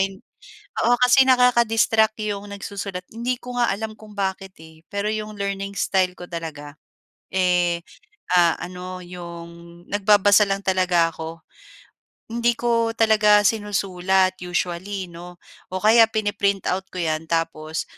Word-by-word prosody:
hin 195 Hz, 0 st, -2 dB, 0.7 s
oo 245 Hz, -, +5 dB
kasi 260 Hz, +2 st, +6 dB
nakaka-distract 225 Hz, -3 st, +3 dB
'yong 205 Hz, -1 st, -4 dB
nagsusulat 195 Hz, -2 st, -6 dB
hindi 235 Hz, +3 st, -2 dB
ko 245 Hz, -1 st, -6 dB
nga 240 Hz, -, +2 dB
alam 220 Hz, +1 st, -5 dB
kung 210 Hz, -1 st, -14 dB
bakit, 195 Hz, -1 st, -3 dB
eh, 160 Hz, 0 st, -17 dB
pero 200 Hz, +1 st, -2 dB
'yong 215 Hz, -1 st, -4 dB
learning 200 Hz, 0 st, -4 dB
style 185 Hz, -2 st, +1 dB
ko -, -, -10 dB
talaga, 155 Hz, -4 st, -7 dB, 0.6 s
eh, 180 Hz, -2 st, +2 dB, 0.6 s
ah, 170 Hz, -2 st, +5 dB
ano 180 Hz, +1 st, -7 dB
'yong 170 Hz, -1 st, -11 dB
nagbabasa 205 Hz, 0 st, +4 dB
lang 195 Hz, 0 st, -2 dB
talaga 185 Hz, -3 st, +2 dB
ako. 160 Hz, +1 st, -8 dB, 0.9 s
Hindi 235 Hz, 0 st, +1 dB
ko 230 Hz, -1 st, 0 dB
talaga 210 Hz, -2 st, +4 dB
sinusulat 190 Hz, -3 st, +1 dB
usually, 180 Hz, +2 st, -3 dB
'no, 175 Hz, +1 st, -11 dB, 0.4 s
o 185 Hz, -, -3 dB
kaya 225 Hz, +1 st, +7 dB
pini-print 205 Hz, -3 st, -1 dB
out 190 Hz, +1 st, -2 dB
ko 185 Hz, -, -3 dB
'yan 160 Hz, -1 st, -1 dB
tapos 160 Hz, -1 st, -2 dB
195 Hz, 135 wpm, -22 LUFS, 175-215 Hz, 0.9 s, kaya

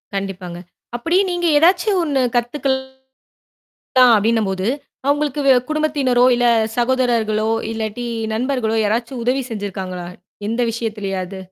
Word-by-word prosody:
கண்டிப்பாங்க. 185 Hz, -3 st, -5 dB, 0.4 s
அப்படி 330 Hz, +10 st, 0 dB
நீங்க, 350 Hz, 0 st, -1 dB
"ஏதாச்சும் 365 Hz, +4 st, +3 dB
ஒண்ணு 280 Hz, -4 st, 0 dB
கத்துக்கலாம்." 265 Hz, +2 st, -1 dB, 1.2 s
அப்படின்னும் 220 Hz, -1 st, +1 dB
போது, 190 Hz, +2 st, -2 dB, 0.4 s
அ -, -, -1 dB
உங்களுக்கு 290 Hz, -1 st, -2 dB
வே 265 Hz, -, +8 dB, 0.2 s
குடும்பத்தினரோ, 285 Hz, -5 st, +2 dB
இல்ல 245 Hz, 0 st, +1 dB, 0.3 s
சகோதரர்களோ, 235 Hz, -4 st, +1 dB, 0.2 s
இல்லாட்டி 225 Hz, +2 st, -4 dB, 0.3 s
நண்பர்களோ, 240 Hz, -2 st, -1 dB
யாராச்சும் 235 Hz, +3 st, -2 dB
உதவி 260 Hz, +1 st, +1 dB
செஞ்சிருக்காங்களா? 190 Hz, -4 st, -5 dB, 0.4 s
எந்த 235 Hz, +2 st, -1 dB
விஷயத்துலையாது? 195 Hz, -5 st, -4 dB
240 Hz, 110 wpm, -19 LUFS, 210-270 Hz, 1.2 s, வே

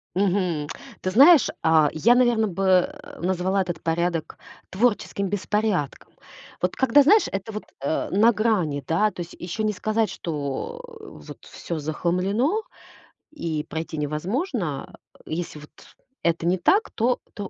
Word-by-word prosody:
Мгм. 180 Hz, -6 st, 0 dB, 0.3 s
Ты 185 Hz, -, -2 dB
знаешь, 280 Hz, -, +7 dB
а, 160 Hz, -2 st, +4 dB
я, 230 Hz, +10 st, +4 dB
наверно, 240 Hz, -3 st, +3 dB
бы, 195 Hz, 0 st, -3 dB
э, 285 Hz, +10 st, +1 dB
назвала 185 Hz, +2 st, 0 dB
этот 175 Hz, -3 st, -4 dB
порядок 165 Hz, 0 st, -1 dB, 0.3 s
творческим 200 Hz, -1 st, 0 dB
беспорядком. 205 Hz, -5 st, -1 dB, 0.5 s
Вот 180 Hz, 0 st, 0 dB
когда 265 Hz, +2 st, +5 dB
знаешь, 415 Hz, +9 st, +5 dB
это 195 Hz, +3 st, -4 dB
вот, 210 Hz, 0 st, -6 dB, 0.2 s
э, 140 Hz, +3 st, -1 dB
на 220 Hz, +4 st, +5 dB
грани, 205 Hz, -11 st, 0 dB
да. 210 Hz, +6 st, +2 dB
То 180 Hz, -, -7 dB
есть 170 Hz, -, -8 dB
ещё 180 Hz, +5 st, -4 dB
не 215 Hz, 0 st, +1 dB
сказать, 215 Hz, +3 st, 0 dB
что, 150 Hz, -, -4 dB, 0.2 s
э, -, -, -18 dB, 0.2 s
вот -, -, -12 dB
всё 170 Hz, -2 st, -6 dB
захламлено 185 Hz, -, 0 dB, 0.7 s
и 165 Hz, -, -3 dB
пройти 160 Hz, 0 st, -5 dB
невозможно, 170 Hz, -, -2 dB
а. -, -, -21 dB
Если 160 Hz, -1 st, -4 dB
вот, 150 Hz, -, -13 dB, 0.5 s
это 165 Hz, 0 st, 0 dB
не 180 Hz, +2 st, +2 dB
так, 405 Hz, -, +2 dB
то, 240 Hz, +2 st, +1 dB, 0.2 s
то, 205 Hz, -2 st, -6 dB
190 Hz, 150 wpm, -24 LUFS, 165-225 Hz, 0.7 s, знаешь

